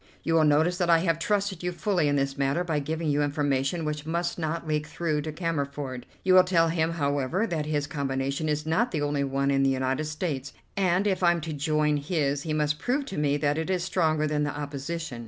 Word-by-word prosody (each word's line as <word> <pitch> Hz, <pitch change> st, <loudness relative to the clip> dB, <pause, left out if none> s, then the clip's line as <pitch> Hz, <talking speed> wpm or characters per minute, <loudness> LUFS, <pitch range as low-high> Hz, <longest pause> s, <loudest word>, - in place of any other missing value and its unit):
You 165 Hz, -, 0 dB
will 160 Hz, -1 st, +5 dB
notice 160 Hz, +5 st, +3 dB
that 175 Hz, -1 st, +1 dB
I 165 Hz, -, +7 dB
have 165 Hz, -1 st, +1 dB
trusted 200 Hz, -1 st, 0 dB
you 180 Hz, 0 st, -1 dB
fully 175 Hz, -1 st, 0 dB
in 145 Hz, -, +2 dB
this 135 Hz, -1 st, 0 dB
matter 140 Hz, +5 st, 0 dB
by 160 Hz, -4 st, -1 dB
giving 155 Hz, +2 st, -2 dB
you 145 Hz, +1 st, +2 dB
information 145 Hz, +2 st, 0 dB
which 150 Hz, -1 st, -3 dB
must 170 Hz, +2 st, -2 dB
not 160 Hz, 0 st, -3 dB
leak 150 Hz, 0 st, -1 dB
through 155 Hz, -3 st, -1 dB
to 155 Hz, +1 st, -4 dB
Cammerford. 140 Hz, -5 st, -3 dB, 0.2 s
You 185 Hz, -, +4 dB
will 185 Hz, 0 st, +8 dB
tell 170 Hz, -3 st, +3 dB
him, 165 Hz, 0 st, 0 dB
however, 145 Hz, -, 0 dB
that 160 Hz, -7 st, -2 dB
his 145 Hz, -1 st, 0 dB
combination 140 Hz, +1 st, -2 dB
is 150 Hz, 0 st, -1 dB
not 190 Hz, +11 st, +1 dB
the 150 Hz, -8 st, -2 dB
only 145 Hz, -1 st, 0 dB
one 140 Hz, 0 st, 0 dB
in 135 Hz, 0 st, +2 dB
the 135 Hz, -, +4 dB
United 130 Hz, +2 st, 0 dB
States, 150 Hz, -3 st, -3 dB, 0.2 s
and 190 Hz, 0 st, +2 dB
if 195 Hz, -2 st, +1 dB
I'm 175 Hz, -1 st, +4 dB
to 155 Hz, 0 st, -4 dB
join 150 Hz, 0 st, +1 dB
his 145 Hz, -2 st, -1 dB
he 155 Hz, -, -4 dB
must 150 Hz, -1 st, 0 dB
prove 270 Hz, -, 0 dB
to 230 Hz, -, -6 dB
me 145 Hz, -1 st, +2 dB
that 145 Hz, +1 st, 0 dB
it 160 Hz, -, -3 dB
is 185 Hz, -2 st, 0 dB
stronger 160 Hz, -4 st, +1 dB
than 150 Hz, -1 st, 0 dB
the 145 Hz, 0 st, -3 dB
opposition. 145 Hz, -1 st, -5 dB
155 Hz, 230 wpm, -27 LUFS, 145-170 Hz, 0.2 s, will